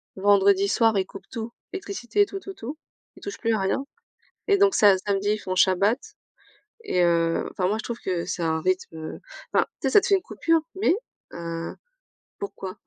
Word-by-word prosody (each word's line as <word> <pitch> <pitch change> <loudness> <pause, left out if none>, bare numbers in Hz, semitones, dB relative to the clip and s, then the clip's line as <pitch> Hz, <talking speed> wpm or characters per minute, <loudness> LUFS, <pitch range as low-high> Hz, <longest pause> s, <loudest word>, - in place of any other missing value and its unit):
vendredis 200 0 +4
soirs, 225 0 +3
ils 190 - +1
coupent 195 0 -12
tout, 230 -1 -5 0.2
l'électricité, 395 -1 0
tout, 390 -1 -6
tout, 390 0 -8
tout. 280 +1 -7 0.4
Ils - - -16
touchent 405 - -5
plus 230 -1 +1
à 215 - +1
rien 195 +8 0 0.6
et 405 - +5
donc 395 -1 +4
sa 200 -3 +6
samedi, 200 +1 0
ils 215 - -1
font 185 -2 -4
shabbat 195 +6 +4 0.9
et 180 - +1
heu, 165 -1 +2
enfin, 180 -1 0
moi, 215 +3 0
je - - -6
trouve 235 -1 -4
que 180 -2 -2
c'est 175 - -3
un 160 -1 0
rythme, 185 -2 -1
heu, 160 0 -7 0.3
enfin, - - +4 0.2
tu 270 - 0
sais, - - 0
ça 410 - +7
te - - -3
fait 395 - +5
une 380 - -4
coupure 330 -1 +1 0.2
mais 380 - +4 0.4
heu, 170 0 -5 0.7
pourquoi? 195 -1 -6
200 Hz, 200 wpm, -25 LUFS, 185-265 Hz, 0.9 s, ça